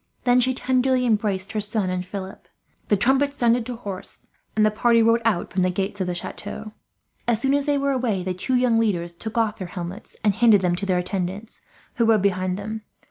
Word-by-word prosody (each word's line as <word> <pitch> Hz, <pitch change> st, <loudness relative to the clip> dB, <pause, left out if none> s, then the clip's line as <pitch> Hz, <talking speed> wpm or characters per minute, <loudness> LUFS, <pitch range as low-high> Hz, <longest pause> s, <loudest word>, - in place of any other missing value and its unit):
Then 245 Hz, 0 st, +4 dB
she 255 Hz, +1 st, +2 dB
tenderly 255 Hz, 0 st, +1 dB
embraced 205 Hz, -3 st, 0 dB
her 215 Hz, -1 st, -1 dB
son 205 Hz, -3 st, -1 dB
and 180 Hz, 0 st, -2 dB
Philip, 190 Hz, +1 st, -8 dB, 0.4 s
the 205 Hz, -, +3 dB
trumpets 270 Hz, +6 st, +2 dB
sounded 235 Hz, -2 st, +2 dB
to 250 Hz, -, -4 dB
horse, 200 Hz, -5 st, -7 dB, 0.3 s
and 215 Hz, 0 st, +4 dB
the 215 Hz, -, +3 dB
party 230 Hz, +2 st, +3 dB
rode 230 Hz, +1 st, +4 dB
out 215 Hz, -6 st, 0 dB
from 190 Hz, -, +1 dB
the 185 Hz, -, +3 dB
gates 195 Hz, +2 st, -2 dB
of 185 Hz, -, -1 dB
the 180 Hz, -, -2 dB
chateau. 205 Hz, +4 st, -6 dB, 0.6 s
As 235 Hz, -3 st, +2 dB
soon 270 Hz, +3 st, +1 dB
as 285 Hz, 0 st, +1 dB
they 290 Hz, -1 st, +2 dB
were 280 Hz, 0 st, +1 dB
away, 235 Hz, -8 st, 0 dB
the 185 Hz, 0 st, -2 dB
two 220 Hz, +8 st, -1 dB
young 245 Hz, -2 st, +3 dB
leaders 175 Hz, -6 st, 0 dB
took 220 Hz, +6 st, -6 dB
off 220 Hz, -2 st, +1 dB
their 185 Hz, -, -4 dB
helmets 175 Hz, +2 st, -7 dB
and 205 Hz, -3 st, +3 dB
handed 225 Hz, -3 st, +5 dB
them 180 Hz, -1 st, +1 dB
to 195 Hz, -, -3 dB
their 185 Hz, -1 st, +2 dB
attendants, 190 Hz, +3 st, -3 dB, 0.4 s
who 235 Hz, -, +3 dB
rode 220 Hz, -3 st, +4 dB
behind 185 Hz, -2 st, 0 dB
them. 215 Hz, +2 st, -5 dB
215 Hz, 220 wpm, -23 LUFS, 190-240 Hz, 0.6 s, handed